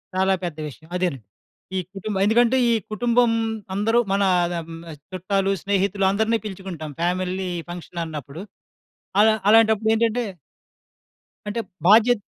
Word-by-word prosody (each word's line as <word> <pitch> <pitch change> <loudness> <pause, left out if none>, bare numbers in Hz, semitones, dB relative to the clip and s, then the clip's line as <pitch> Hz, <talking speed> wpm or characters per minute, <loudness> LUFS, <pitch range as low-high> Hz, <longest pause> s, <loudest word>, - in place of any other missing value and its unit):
చాలా 190 +1 +3
పెద్ద 165 -3 -4
విషయం. 155 +3 -12
అదేనండి. 175 -9 -1 0.6
ఈ - - +1 0.2
కుటుంబం 195 0 -3
ఎందుకంటే, 240 +4 +4
ఈ - - +4 0.2
కుటుంబం 235 +2 +2 0.4
అందరు 225 +4 +2
మనా 195 0 +2 0.2
అద‌మ్ 165 -1 -5 0.4
చుట్టాలు, 195 +2 0
స్నేహితులు 200 0 +1
అందరిని 220 +3 +1
పిలుచుకుంటాం 185 -6 -6
ఫ్యామిలీ 185 +1 -1 0.2
ఫంక్షనన్నప్పుడు. 165 -2 -6 0.8
అల 215 - +7 0.2
అలాంటప్పుడేంటంటే 225 +1 +3 1.2
అంటే, 210 +3 -3 0.3
బాధ్యత 225 +1 +6
195 Hz, 105 wpm, -23 LUFS, 180-220 Hz, 1.2 s, అల